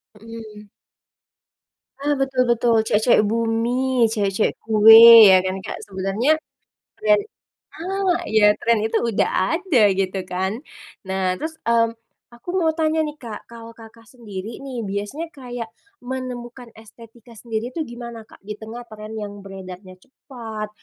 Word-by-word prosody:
Mhm. 215 -1 -11 1.3
Ah, 290 +1 +1
betul 265 -1 0
betul 235 0 +2
cewek-cewek 215 +2 +3
bumi, 230 +3 0
cewek-cewek 205 -2 0
kue 220 +1 +8 0.3
ya 185 - +5
kan 185 0 -2
Kak - - -6
sebenernya 200 +10 0 0.6
dan 210 -1 +4 0.6
ah, 375 +1 -1 0.4
tren 235 -1 +2
itu 220 - 0
udah 200 - +1 0.3
ada 345 -7 0 0.2
gitu 190 0 -2
kan 190 +5 -3 0.5
nah 190 -1 -1
terus, 315 0 -5
mmm, 230 0 +1 0.4
aku 235 - -20
mau 325 -2 +2
tanya 315 0 +1
nih 300 - -6
Kak, 220 -3 -8
kalau 230 0 -11
Kakak 225 0 -15
sendiri 220 -3 -8
nih 260 -4 -6
biasanya 205 +12 -4
kayak 245 -5 -8 0.3
menemukan 245 -1 -7
estetika 230 +1 -16
sendiri 230 +1 -4
tuh 310 +2 -4
gimana 235 -1 -8
Kak, - - -19
di 210 +1 -8
tengah 225 +2 -9
tren 215 0 -9
yang 205 0 -8
beredarnya 190 -1 -10
cepat, 225 -6 -9
230 Hz, 135 wpm, -21 LUFS, 210-250 Hz, 1.3 s, kue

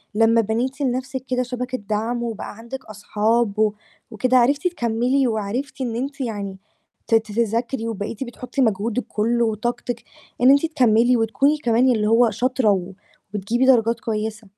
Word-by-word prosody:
لمّا 230 +1 +4
بنيتِ 245 +6 -2
لنَفْسِك 260 0 -2
كده 250 0 0
شبكة 250 +1 -4
دعم 225 +3 -2
وبقى 225 -3 -5
عندِك 235 +4 -8
أصحاب 215 +1 0
و 215 -1 +3 0.4
وكده، 255 +4 +2
عرفتِ 280 +7 +3
تكمّلي 250 -3 +1
وعرفتِ 230 +6 -3
إن 235 -3 -2
أنتِ 275 +3 -4
يعني 200 -5 -4 0.5
ت 225 - +3
ت 225 - +2
تذاكري، 230 +2 -1
وبقيتِ 220 +3 -4
بتحطّي 250 +2 -4
مجهودِك 225 +2 0
كلّه 235 +2 +1
وطاقتِك 240 +2 -3 0.4
إن 250 - +6
أنتِ 280 +3 +5
تكمّلي 245 -5 +3
وتكوني 230 +7 +2
كمان 245 -1 +2
اللي 215 -3 +1
هو 230 +1 +5
شاطرة 250 +1 +1
و 190 0 -2 0.4
وبتجيبي 225 +6 0
درجات 235 -3 +4
كويسة. 220 0 -4
235 Hz, 150 wpm, -22 LUFS, 220-255 Hz, 0.5 s, إن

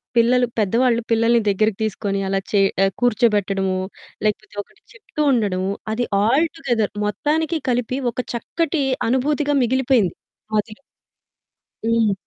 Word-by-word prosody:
పిల్లలు 245 +2 +4
పెద్దవాళ్ళు 235 +3 +2
పిల్లల్ని 230 +1 +3
దగ్గరికి 205 +1 +2
తీసుకొని 200 -2 -2
అలా 195 0 0
చే 205 - +4 0.4
కూర్చోబెట్టడము, 205 -5 +2 0.5
లేకపోతే 215 0 -2
ఒకటి - - -28
చెప్తూ 395 -10 -6
ఉండడము. 195 -5 0 0.2
అది 240 +3 0 0.2
ఆల్ 270 +10 +3
టుగెదర్ 240 -9 -1
మొత్తానికి 310 - 0
కలిపి 250 +1 0
ఒక 250 - -3
చక్కటి 300 +5 -1 0.2
అనుభూతిగా 290 +4 +1
మిగిలిపోయింది 245 -6 +2 0.4
మదిలో. 215 +2 -2 1.1
హ్మ్. 225 -2 +2
230 Hz, 110 wpm, -21 LUFS, 210-255 Hz, 1.1 s, పిల్లలు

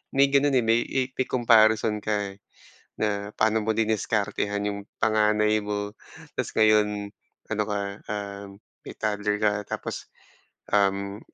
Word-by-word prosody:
may 140 0 +4
ganun, 140 0 +3
eh, 125 - +3
may 115 +1 +3
may 130 0 -1
i 130 - 0
comparison 110 -3 +4
ka, 105 -2 -1
eh, 100 - -22 0.6
na 100 -1 -1
paano 110 0 +2
mo 110 - +1
diniskartehan 105 -2 0
yung 100 - -6 0.2
panganay 105 0 +3
mo 105 0 -3 0.4
ta's - - -2
ngayon 105 -1 +3 0.3
ano 105 -1 0
ka, 105 -1 -2 0.3
um, 100 -1 -5 0.4
may - - -8
toddler 105 -1 -1
ka. 105 -1 +3
Tapos, - - -6 0.6
um, 100 0 +1
105 Hz, 140 wpm, -26 LUFS, 105-110 Hz, 0.6 s, may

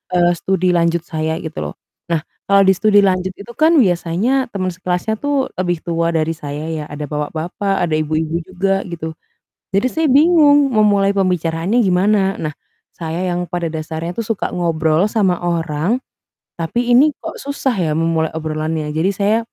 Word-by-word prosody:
eee, 175 0 +4
studi 185 0 0
lanjut 170 0 +2
saya, 160 -1 -2
gitu 160 -1 -7
loh. - - -15 0.3
Nah, 165 -2 +1 0.3
kalau 200 0 +6
di 190 - +6
studi 205 +2 +4
lanjut 185 -1 +1
itu 205 +4 -11
kan 315 +2 +4
biasanya 195 +6 +1
teman 185 -2 -2
sekelasnya 180 +4 -2
tuh 285 -2 0
lebih 175 -2 0
tua 170 0 0
dari 160 0 +1
saya 145 -1 -6
ya. 155 -2 -3
Ada 150 0 -5
bapak-bapak, 165 +6 -2
ada - - -6
ibu-ibu 155 +1 -1
juga, 195 +1 0
gitu. 165 -2 -5 0.6
Jadi, 200 +6 +3
saya 320 0 +1
bingung 290 0 +5
memulai 205 -2 +4
pembicaraannya 180 +1 0
gimana? 195 +1 +2
Nah, 155 - -2 0.4
saya 165 +2 -3
yang 175 0 -2
pada 175 -1 -3
dasarnya 160 +2 -5
tuh 230 - -2
suka 225 -2 -2
ngobrol 165 0 +1
sama 190 -6 +1
orang, 170 +4 0 0.6
tapi 235 +9 -1
ini 285 +5 +6
kok - - -7
susah 280 -2 -1
ya 175 -6 0
memulai 165 -1 +1
obrolannya. 155 0 -2
Jadi, 165 +5 +1
saya, 205 +3 +2
180 Hz, 165 wpm, -18 LUFS, 160-200 Hz, 0.6 s, kalau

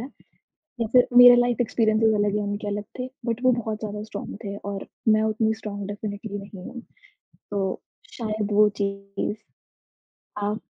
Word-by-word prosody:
है 250 - -6 0.7
या 230 - +1
फिर 250 -1 +6
मेरा 245 0 +11
लाइफ़ 245 -1 +2
एक्सपीरियंसेस 220 -1 +2
अलग 205 0 +1
हैं, 210 - 0
उनके 205 +1 -3
अलग 205 0 -3
थे, 255 0 -3 0.2
बट 235 +1 -2
वो 255 - +6
बहुत 220 -3 -2
ज़्यादा 210 -1 -5
स्ट्रॉन्ग 210 -2 -7
थे 200 0 -4
और 200 -1 -6 0.2
मैं 215 0 +5
उतनी 220 0 +1
स्ट्रॉन्ग 205 -2 -6
डेफ़िनेटली 205 0 -5
नहीं 195 -2 -10
हूँ, 245 - -8 0.7
तो 195 -2 -2 0.3
शायद 215 -2 -3
वो 210 +1 +5
चीज़ 200 +1 -3 1.0
हाँ, 205 +1 -1
210 Hz, 160 wpm, -25 LUFS, 205-225 Hz, 1.0 s, मेरा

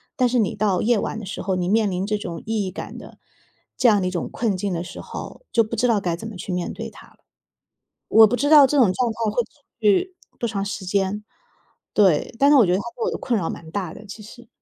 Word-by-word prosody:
但 255 - +3
是 245 +1 0
你 210 - 0
到 205 -3 +1
夜 230 -1 +2
晚 220 - -3
的 215 - -8
时 - - -6
候， 190 -1 -1
你 180 0 -1
面 215 0 +3
临 185 +1 -2
这 210 0 -1
种 170 -5 -6
意 220 -2 -1
义 185 - -4
感 190 - -8
的 - - -12 0.6
这 250 - +4
样 210 -3 +4
的 185 - 0
一 180 - -2
种 175 - -3
困 220 -5 -1
境 195 0 -2
的 170 0 -2
时 180 - -9
候， - - -9
就 230 - +4
不 220 +2 -5
知 245 +3 +1
道 220 -3 +3
该 175 -3 -1
怎 195 +6 -8
么 225 - -8
去 185 +1 -6
面 180 -1 -2
对 - - -6
它 - - -15
了。 - - -25 0.9
我 220 0 +8
不 245 +4 0
知 290 +3 0
道 295 -3 +9
这 290 - -1
种 230 -9 +5
状 245 +3 0
态 - - -16 0.2
会 245 - +2
持 290 - -27 0.2
续 220 - +2 0.2
多 235 - -1
长 200 -2 -2
时 200 -1 -5
间。 195 +2 -1 0.7
对， 190 -5 +3
但 280 +3 +5
是 290 - +7
我 245 - +7
觉 180 - +1
得 185 - +2
它 - - -3
对 235 - -3
我 - - 0
的 - - -4
困 235 -3 0
扰 170 - -2
蛮 160 - -8
大 185 -4 -3
的， 215 - -12
其 200 +2 -10
实。 235 +3 -14
210 Hz, 295 characters per minute, -22 LUFS, 185-230 Hz, 0.9 s, 道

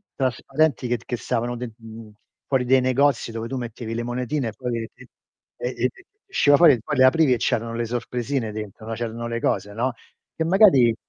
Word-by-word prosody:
trasparenti 135 +1 0
che 120 - +1
che 120 - -3
stavano 120 +2 -2
den 120 -2 -6
mhmm, 115 -1 -12 0.4
fuori 130 -2 +1
dei 130 +1 +4
negozi 130 -2 +2
dove 115 0 -5
tu 135 - -4
mettevi 115 -1 -5
le 120 - -2
monetine 125 +1 -2
e - - -9
poi 125 -2 -3
l - - -7
t - - -21 0.6
e 125 - -3
e 120 - -6
e - - +3
ti - - -20 0.2
usciva 145 - +4
fuori 160 -2 +7
e 115 - -2
poi 150 -3 -3
le 130 - +6
aprivi 135 0 +4
e - - +1
c'erano 115 +1 -1
le 120 0 -2
sorpresine 120 0 -3
dentro, 110 +1 -7
c'erano 115 0 -4
le 115 0 -3
cose, 100 -1 -1
no. 120 +3 -1 0.4
Che 160 - -1
magari 165 - +5
120 Hz, 210 wpm, -23 LUFS, 115-130 Hz, 0.6 s, fuori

